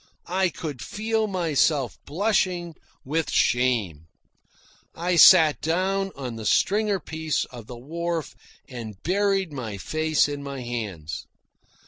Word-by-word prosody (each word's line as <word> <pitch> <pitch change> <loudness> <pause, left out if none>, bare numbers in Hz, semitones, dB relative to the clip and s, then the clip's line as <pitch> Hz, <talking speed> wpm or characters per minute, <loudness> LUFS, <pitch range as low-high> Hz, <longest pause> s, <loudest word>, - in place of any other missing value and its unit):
I 190 0 +3
could 150 -7 -6
feel 220 - -1
myself 155 - +1
blushing 180 0 0 0.3
with 155 +4 -1
shame. 110 -11 +1 0.9
I 175 +2 0
sat 155 -1 +7
down 190 +4 0
on 125 -4 -6
the 110 - -6
stringer 205 -1 +2
piece 160 -1 -2
of 120 -4 -10
the 125 - -8
wharf 165 +5 -4 0.3
and 115 -5 -7
buried 195 -1 +1
my 115 -7 -5
face 155 +8 +1
in 145 -1 -5
my 140 -2 -6
hands. 100 -10 -5
155 Hz, 120 wpm, -25 LUFS, 125-185 Hz, 0.9 s, sat